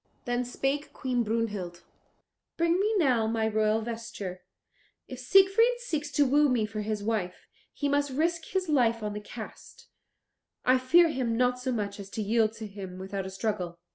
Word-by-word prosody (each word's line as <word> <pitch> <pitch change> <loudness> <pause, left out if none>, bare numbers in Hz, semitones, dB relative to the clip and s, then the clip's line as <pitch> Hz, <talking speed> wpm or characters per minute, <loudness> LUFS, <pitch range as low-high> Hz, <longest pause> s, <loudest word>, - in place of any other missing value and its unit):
Then 245 0 0
spake 270 +4 -2
Queen 255 -3 -1
Brunhild, 210 -6 -2 0.7
"Bring 335 +2 +2
me 425 +2 +2
now 250 - +3
my 220 0 0
royal 215 0 +1
vesture; 225 -5 -6 0.7
if 255 - -8
Siegfried 390 - +5
seeks 310 -12 -3
to 290 +2 +4
woo 290 +2 +4
me 240 -4 +2
for 215 0 -5
his 210 -1 -3
wife, 205 -5 -2 0.3
he 285 - -2
must 285 0 +1
risk 325 +4 0
his 375 -1 -2
life 235 -7 +2
on 210 -1 -2
the 210 - -5
cast; - - -11 0.8
I 255 +1 +5
fear 330 +7 +5
him 245 -6 -1
not 250 0 +2
so 255 +1 -2
much 205 -4 -3
as 195 -1 -8
to 215 - 0
yield 220 +1 +2
to 225 -1 -7
him 195 -3 -8
without 190 0 -4
a - - -5
struggle." 190 -3 -3
230 Hz, 175 wpm, -28 LUFS, 210-285 Hz, 0.8 s, Siegfried